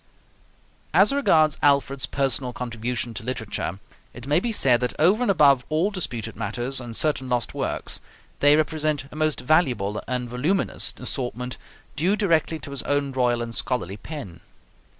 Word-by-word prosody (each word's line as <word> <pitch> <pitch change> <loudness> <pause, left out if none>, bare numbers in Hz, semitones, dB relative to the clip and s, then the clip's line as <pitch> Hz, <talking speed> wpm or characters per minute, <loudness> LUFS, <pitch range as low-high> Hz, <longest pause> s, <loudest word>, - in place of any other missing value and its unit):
As - - +5
regards 155 - +3
Alfred's 140 -2 +2
personal 135 -2 0
contribution 120 -1 -3
to 110 - -6
literature, 110 -6 -3 0.4
it 120 - -9
may 145 +4 +3
be 235 +5 -2
said 130 - +4
that 125 - -1
over 190 +9 +4
and 245 - +1
above 140 -8 +5
all 160 +7 +1
disputed 120 - -4
matters 125 +4 -3
and 115 -2 -7
certain 145 -4 -1
lost 120 -3 -1
works, - - -4 0.4
they 145 +1 +6
represent 155 -2 0
a - - -11
most 155 -1 0
valuable 125 - +1
and 125 -1 -2
voluminous 140 +11 0
assortment 125 -1 -3 0.4
due 180 +7 +2
directly 165 -6 +1
to 140 -1 -9
his 140 - -4
own 145 -1 0
royal 120 -2 +1
and 115 0 -6
scholarly 110 -6 -2
pen. 130 - -8
135 Hz, 155 wpm, -24 LUFS, 120-155 Hz, 0.4 s, they